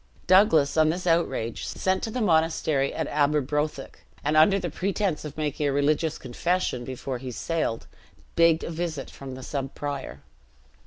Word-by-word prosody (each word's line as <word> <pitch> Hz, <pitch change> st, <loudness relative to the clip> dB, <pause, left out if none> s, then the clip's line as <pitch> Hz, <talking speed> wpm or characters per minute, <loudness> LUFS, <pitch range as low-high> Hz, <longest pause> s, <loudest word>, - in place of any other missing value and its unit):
Douglas, 170 Hz, -6 st, +5 dB
on 155 Hz, 0 st, +5 dB
this 180 Hz, +3 st, -2 dB
outrage, 135 Hz, -9 st, 0 dB
sent 190 Hz, 0 st, -1 dB
to -, -, -3 dB
the 245 Hz, +3 st, -3 dB
monastery 160 Hz, -6 st, +2 dB
at -, -, -3 dB
Aberbrothick, 150 Hz, 0 st, -1 dB, 0.2 s
and 150 Hz, +2 st, +1 dB
under 160 Hz, +6 st, +6 dB
the 175 Hz, -4 st, -3 dB
pretense 190 Hz, -1 st, -1 dB
of 150 Hz, 0 st, -8 dB
making 150 Hz, -1 st, -1 dB
a -, -, +1 dB
religious 150 Hz, +3 st, +1 dB
confession 130 Hz, 0 st, -1 dB
before 130 Hz, 0 st, -5 dB
he 130 Hz, 0 st, -6 dB
sailed, 155 Hz, -1 st, -2 dB, 0.5 s
begged 165 Hz, -1 st, +4 dB
a -, -, -4 dB
visit 160 Hz, -4 st, -4 dB
from 135 Hz, -2 st, -8 dB
the 130 Hz, -, -9 dB
sub 135 Hz, 0 st, -4 dB
prior. 145 Hz, -2 st, -5 dB
155 Hz, 160 wpm, -26 LUFS, 140-170 Hz, 0.5 s, under